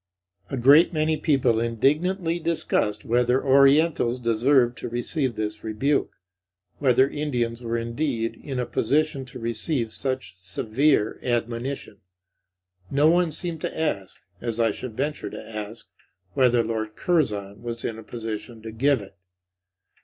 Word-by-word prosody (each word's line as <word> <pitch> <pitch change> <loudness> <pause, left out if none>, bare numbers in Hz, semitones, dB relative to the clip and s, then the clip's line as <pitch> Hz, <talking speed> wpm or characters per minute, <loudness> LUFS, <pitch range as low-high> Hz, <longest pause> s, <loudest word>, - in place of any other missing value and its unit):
A 135 - -3
great 140 +7 +6
many 155 0 +1
people 135 -7 +2
indignantly 165 - +1
discussed 160 -10 -1
whether 125 +3 +2
orientals 140 -1 +4
deserved 120 +2 +3
to - - -5
receive 120 +2 -1
this 105 0 -4
rebuke; 125 +7 0 0.7
whether 130 -1 +4
Indians 125 -6 -2
were 115 -1 -2
indeed 115 0 -2
in 135 -3 -4
a 125 - 0
position 140 +4 0
to 125 - -10
receive 115 +1 -2
such 130 -7 -3
severe 110 +7 +1
admonition. 120 -2 -3 0.9
No 145 +3 +4
one 175 0 +3
seemed 165 0 -4
to - - -4
ask, 100 -12 -2 0.2
as 115 -1 -3
I 115 -1 +3
should 110 +1 -7
venture 145 +2 -2
to - - -9
ask, 110 +1 -5 0.5
whether 125 -3 +3
Lord 110 -1 -3
Curzon 105 - 0
was 115 -1 -5
in 110 -1 -3
a - - -10
position 110 0 -6
to 110 - -6
give 130 +2 +2
it. 95 - -14
120 Hz, 140 wpm, -25 LUFS, 115-145 Hz, 0.9 s, great